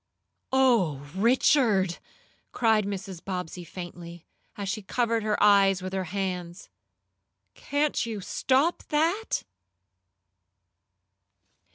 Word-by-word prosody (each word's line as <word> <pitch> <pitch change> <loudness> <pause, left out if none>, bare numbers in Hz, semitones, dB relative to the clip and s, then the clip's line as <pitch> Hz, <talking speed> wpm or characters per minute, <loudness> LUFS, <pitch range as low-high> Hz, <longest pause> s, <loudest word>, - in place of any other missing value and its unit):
"Oh, 215 - +2
Richard!" 215 - +3 0.5
cried 220 -3 +2
Mrs. 195 -3 -6
Bobbsey 180 -2 -5
faintly, 175 -1 -9 0.3
as 200 -1 -4
she 215 +3 -2
covered 230 +2 0
her 215 -1 0
eyes 195 -2 +5
with 185 0 -5
her 190 -1 -2
hands. 180 -1 -4 0.8
"Can't 290 +1 -1
you 225 -3 -4
stop 270 - +1
that?" 335 +9 0
200 Hz, 90 wpm, -27 LUFS, 180-240 Hz, 0.8 s, eyes